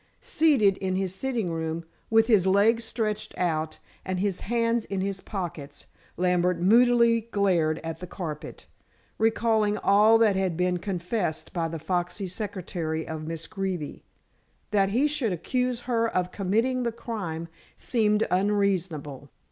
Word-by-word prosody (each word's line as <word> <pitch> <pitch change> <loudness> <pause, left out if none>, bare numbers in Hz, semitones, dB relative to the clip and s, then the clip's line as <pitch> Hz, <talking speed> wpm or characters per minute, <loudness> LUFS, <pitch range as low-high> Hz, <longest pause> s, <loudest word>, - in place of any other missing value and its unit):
Seated 295 - +3
in 185 -1 -2
his 190 -1 -1
sitting 225 -3 -2
room, 165 0 -3 0.2
with 225 0 +5
his 210 -6 +4
legs 215 +4 +4
stretched 215 -2 -3
out 160 -3 -1 0.3
and 185 -1 -3
his 195 -1 0
hands 230 0 0
in 195 -1 -3
his 195 0 -2
pockets, 165 -8 -6 0.3
Lambert 180 0 +2
moodily 230 +3 +4
glared 175 -7 +2
at 165 0 -5
the 180 - -7
carpet, 160 -4 -7 0.5
recalling 220 -1 +2
all 210 +3 +5
that 220 -3 +4
had 190 -4 0
been 180 0 +1
confessed 180 -2 -3
by 170 -3 0
the 165 0 -5
foxy 180 +5 -2
secretary 180 -4 -4
of 155 -1 -5
Miss 165 0 -5
Greeby. 190 -7 -4 0.7
That 195 -2 +3
he 245 +8 +2
should 280 -9 0
accuse 250 +6 -1
her 230 -2 +1
of 180 -3 -1
committing 225 +7 0
the 235 -1 0
crime 190 -8 -5 0.3
seemed 215 -3 +1
unreasonable. 180 -8 0
195 Hz, 140 wpm, -26 LUFS, 175-225 Hz, 0.7 s, with